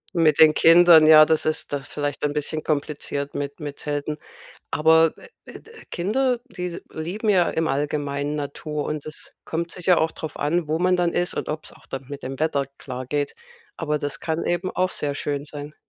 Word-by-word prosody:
Mit 160 -3 +3
den 155 -1 +8
Kindern, 165 -1 +7
ja, 155 -1 +9
das 160 0 +2
ist 155 -1 -1
das 140 - -1
ist - - -14
vielleicht 145 -1 -4
ein 145 -1 0
bisschen 150 +1 -2
kompliziert 145 -1 -3
mit 145 +1 -5
mit 145 -2 -6
Zelten. 150 +1 -3 0.5
Aber, 160 +1 +4
äh, - - -14 0.2
äh, - - -11
d 455 - -17 0.2
Kinder, 245 +8 0
die 180 -8 -6
s 175 -1 -5
lieben 185 +8 -3
ja 180 -4 +4
im 160 0 0
Allgemeinen 145 0 -2
Natur 150 +1 -4
und 150 -1 -4
es 155 0 -6
kommt 170 +1 -3
sicher 180 0 +2
auch 160 0 +1
drauf 160 - -7
an, 155 +2 0
wo 155 +1 0
man 180 +1 +3
dann 175 -1 0
ist 175 - -1
und - - -3
ob's 155 0 -5
auch - - -20
dann 135 0 -7
mit 140 0 -8
dem 135 +1 -6
Wetter 155 -3 +1 0.2
klar 130 -1 -6
geht. 145 +2 -2 0.4
Aber 150 -2 -1
das 145 -1 -4
kann 160 0 -2
eben 175 +2 -1
auch 185 0 0
sehr 145 -5 -3
schön 145 0 -3
sein. 145 0 -8
155 Hz, 210 wpm, -23 LUFS, 145-170 Hz, 0.5 s, ja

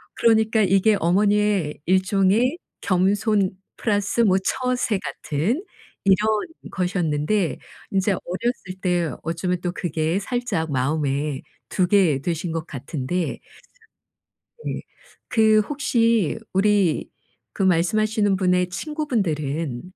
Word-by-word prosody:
그러니까 220 -1 +3
이게 195 +2 +3
어머니의 200 -3 +2
일종의 195 - +2 0.2
겸손 200 +1 +2 0.3
플러스 205 +1 0
뭐 190 -4 +4
처세 250 -5 0
같은 185 - -2 0.4
이런 195 -1 +6 0.5
것이었는데 180 0 0 0.3
이제 195 +1 +2
어렸을 185 0 -4
때 175 -4 +1
어쩌면 170 +2 -2
또 175 - -2
그게 165 0 -1
살짝 205 - -2
마음에 140 +1 -1 0.3
두게 180 -7 +3
되신 165 +1 -2
것 165 -1 -3
같은데 145 +4 -3 1.3
네. - - -3 0.5
그 220 -2 +4
혹시 230 - +1 0.2
우리 195 -4 +2 0.4
그 195 - -2
말씀하시는 205 +3 +2
분의 180 -1 +2
친구분들은 165 - -2
190 Hz, 225 characters per minute, -23 LUFS, 165-215 Hz, 1.3 s, 이런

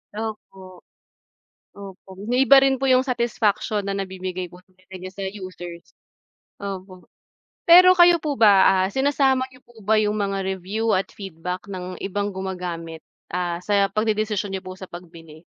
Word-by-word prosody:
Opo. 195 -4 -8 1.0
Opo, 195 -1 -12
iba 270 +2 +6
rin 270 0 +2
po 270 - -4
yung 255 -1 +5
satisfaction 235 -5 -1
na 195 - -2
nabibigay 185 -1 -5
po 180 +1 -15
talaga 185 +1 -27
niya 185 - -7
sa 195 +1 -7
users. 185 -3 -8 0.7
Opo, 190 -2 -8 0.6
pero 365 +2 +9
kayo 345 0 +7
po 295 -3 -3
ba, 195 -3 +5
ah, - - -3
sinasama 265 +1 +1
n'yo 255 - -18
po 230 -3 -18
ba 215 +2 +2
yung 210 0 +1
mga 195 -1 -1
review 190 +4 -1
at 190 - -1
feedback 180 -1 -7
ng 185 -2 -7
ibang 205 +1 -3
gumagamit, 180 -4 -6 0.3
ah, 175 -1 -2
sa 200 +2 +1
pagdedesisyon 215 -1 -1
n'yo 190 - -4
po 185 -1 -9
sa 190 - -8
pagbili? 165 -3 -13
195 Hz, 150 wpm, -22 LUFS, 185-220 Hz, 1.0 s, pero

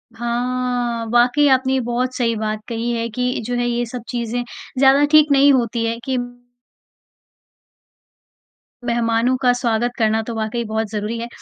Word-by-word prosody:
हाँ, 240 0 -2
वाक़ई 245 +5 +4
आपने 260 0 +2
ये 265 - +2
बहुत 245 +2 -2
सही 230 -2 0
बात 215 0 -3
कही 230 +1 -2
है 230 0 -2
कि 250 +3 -1
जो 245 0 -2
है 245 0 0
ये 240 0 -1
सब 245 +1 -7
चीज़ें 240 0 -2 0.3
ज़्यादा 275 +2 +5
ठीक 305 -1 +6
नहीं 280 +1 +6
होती 235 -2 0
है 230 0 -1
कि 260 -1 -1 2.7
मेहमानों 235 +1 +1
का 250 -2 +4
स्वागत 240 -1 0
करना 220 -1 +2
तो 235 - -4
वाक़ई 220 +2 -2
बहुत 220 0 -2
ज़रूरी 215 +2 -3
है। 235 - -4
240 Hz, 160 wpm, -20 LUFS, 230-250 Hz, 2.7 s, ठीक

